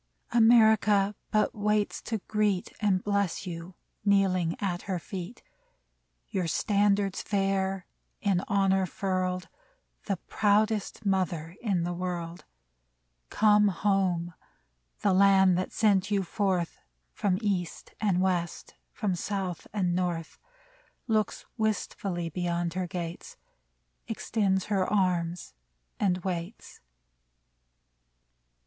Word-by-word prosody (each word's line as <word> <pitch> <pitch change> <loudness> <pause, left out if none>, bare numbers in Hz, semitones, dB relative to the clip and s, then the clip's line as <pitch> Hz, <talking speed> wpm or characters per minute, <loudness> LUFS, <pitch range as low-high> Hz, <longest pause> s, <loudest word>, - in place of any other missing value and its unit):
America 220 -3 +5 0.2
but 215 0 +2
waits 210 0 0
to 225 - -2
greet 210 -3 0
And 195 -3 +2
bless 200 -2 0
you, 175 0 -7 0.3
kneeling 190 -4 +2
at 180 -4 -2
her 185 - 0
feet, 185 +5 -7 0.8
Your 185 -3 -2
standards 200 +1 +1
fair, 195 -2 0 0.3
in 195 -3 +1
honor 195 -1 +2
furled, 185 -1 -2 0.6
The 195 -3 -1
proudest 210 +3 0
mother 180 -4 -1
in 195 -7 0
the 175 +1 -2
world! 175 -1 -4 0.8
Come 210 -1 +4
home! 185 -3 0 0.7
The 200 - +3
Land 190 -1 +5
that 185 - -3
sent 205 -3 +2
you 200 -2 +1
forth 185 -2 -1 0.3
From 190 -3 0
East 195 -6 -3
and 195 -4 +2
West, 175 -3 -1 0.2
from 210 -5 -1
South 185 0 -3
and 185 -4 0
North, 175 -3 -2 0.7
Looks 215 -3 0
wistfully 200 -5 -2
beyond 170 0 -2
her 185 0 -2
gates. 170 -2 -6 0.7
Extends 195 -4 0
her 195 -3 0
arms 180 -4 0 0.5
and 185 -3 +2
waits 180 +3 -5
190 Hz, 105 wpm, -28 LUFS, 180-205 Hz, 0.8 s, America